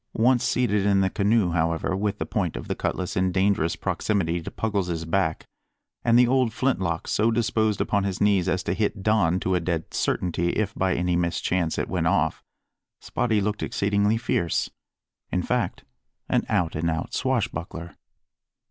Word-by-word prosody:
Once 120 Hz, +2 st, +3 dB
seated 105 Hz, -5 st, +1 dB
in 100 Hz, -1 st, +3 dB
the 95 Hz, -1 st, +1 dB
canoe, 100 Hz, -2 st, +2 dB
however, 80 Hz, +2 st, 0 dB
with 100 Hz, +1 st, -1 dB
the -, -, -3 dB
point -, -, -2 dB
of -, -, -6 dB
the -, -, -1 dB
cutlass 95 Hz, 0 st, -3 dB
in 95 Hz, 0 st, +1 dB
dangerous 95 Hz, -3 st, +1 dB
proximity 85 Hz, -5 st, -1 dB
to -, -, -6 dB
Puggles's 90 Hz, -6 st, -2 dB
back, 80 Hz, -1 st, 0 dB, 0.6 s
and 115 Hz, 0 st, +4 dB
the 125 Hz, 0 st, +6 dB
old 130 Hz, -2 st, +2 dB
flint 130 Hz, -2 st, 0 dB
lock 85 Hz, -3 st, -2 dB
so 110 Hz, +2 st, +2 dB
disposed 110 Hz, -2 st, +1 dB
upon 100 Hz, -2 st, +1 dB
his 95 Hz, -2 st, -2 dB
knees 100 Hz, -3 st, +3 dB
as 95 Hz, 0 st, 0 dB
to -, -, -1 dB
hit 105 Hz, -2 st, -1 dB
Don 95 Hz, -5 st, +2 dB
to 95 Hz, -, 0 dB
a 90 Hz, -, +2 dB
dead 85 Hz, -1 st, -3 dB
certainty 85 Hz, -1 st, 0 dB
if 110 Hz, 0 st, -1 dB
by 95 Hz, -3 st, 0 dB
any 90 Hz, 0 st, 0 dB
mischance 85 Hz, 0 st, 0 dB
it -, -, -1 dB
went -, -, -1 dB
off, -, -, +1 dB, 0.6 s
Spottie 110 Hz, -4 st, 0 dB
looked 105 Hz, +1 st, -2 dB
exceedingly 100 Hz, +2 st, +1 dB
fierce 85 Hz, -7 st, -1 dB, 0.6 s
in -, -, 0 dB
fact, -, -, -1 dB, 0.4 s
an -, -, +1 dB
out 85 Hz, -2 st, 0 dB
and 80 Hz, +2 st, 0 dB
out 80 Hz, 0 st, -3 dB
swashbuckler. 85 Hz, -9 st, -2 dB
95 Hz, 175 wpm, -25 LUFS, 85-110 Hz, 0.6 s, the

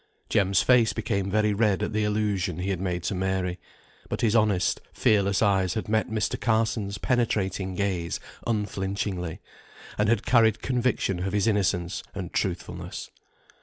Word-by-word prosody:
Jem's 100 Hz, -1 st, +3 dB
face 125 Hz, -3 st, +4 dB
became 100 Hz, -4 st, -1 dB
very 105 Hz, +1 st, +2 dB
red 105 Hz, -2 st, +2 dB
at -, -, -2 dB
the 110 Hz, 0 st, +1 dB
allusion 105 Hz, -5 st, 0 dB
he 95 Hz, +2 st, -1 dB
made 90 Hz, -1 st, -3 dB
to 95 Hz, -, -1 dB
Mary, 95 Hz, -1 st, -1 dB, 0.5 s
but -, -, -3 dB
his 115 Hz, -1 st, +2 dB
honest, 105 Hz, -5 st, +2 dB
fearless 100 Hz, -1 st, +2 dB
eyes 95 Hz, -3 st, +2 dB
had 110 Hz, -, -3 dB
met 110 Hz, +1 st, +1 dB
Mr. 110 Hz, -2 st, -1 dB
Carson's 110 Hz, -3 st, 0 dB
penetrating 100 Hz, -6 st, 0 dB
gaze 90 Hz, -4 st, -1 dB, 0.3 s
unflinchingly, 100 Hz, -5 st, -2 dB, 0.6 s
and 105 Hz, 0 st, +3 dB
had 115 Hz, -1 st, +1 dB
carried 115 Hz, -2 st, +4 dB
conviction 125 Hz, -7 st, 0 dB
of 95 Hz, +2 st, -2 dB
his 105 Hz, 0 st, +2 dB
innocence 95 Hz, -5 st, 0 dB
and 90 Hz, -3 st, -5 dB
truthfulness. 95 Hz, -3 st, -3 dB
100 Hz, 145 wpm, -26 LUFS, 95-110 Hz, 0.6 s, face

